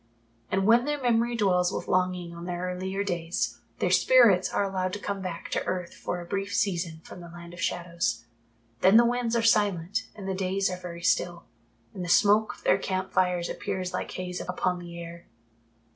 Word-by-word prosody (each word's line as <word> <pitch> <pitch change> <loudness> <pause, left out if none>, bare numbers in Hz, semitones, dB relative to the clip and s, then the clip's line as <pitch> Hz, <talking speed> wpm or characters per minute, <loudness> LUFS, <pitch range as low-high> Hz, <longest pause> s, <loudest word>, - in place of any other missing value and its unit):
And 190 0 +1
when 235 +3 +5
their 295 0 -1
memory 240 -1 +2
dwells 180 -5 +2
with - - -4
longing 180 -2 0
on 170 0 -8
their 175 0 -4
earlier 190 +2 -3
days, 175 -3 -2 0.2
their - - 0
spirits - - +5
are - - 0
allowed 185 -1 -2
to 205 - -3
come 200 -1 -4
back 180 -3 -6
to - - 0
earth 180 -2 -3
for 175 - -4
a 175 - -7
brief 200 +2 -3
season 170 -4 -1
from 180 - -11
the 170 - -10
Land 170 0 -11
of 175 - -8
Shadows. 170 -9 -1 0.5
Then 190 +4 +6
the 235 - +7
winds 240 -1 0
are 230 - +2
silent 205 -2 +2
and 200 -3 -8
the 190 - -1
days 190 0 0
are 180 - -4
very 170 -1 -8
still, 175 -1 +1 0.5
and 185 - -5
the 175 - -5
smoke 210 +4 +4
of - - -20
their - - +3
camp 190 0 -3
fires 180 -2 +2
appears 185 -1 -4
like - - -3
haze 180 -1 -5
upon 180 0 -1
the 170 -1 -9
air. 170 0 -9
185 Hz, 200 wpm, -27 LUFS, 175-200 Hz, 0.5 s, the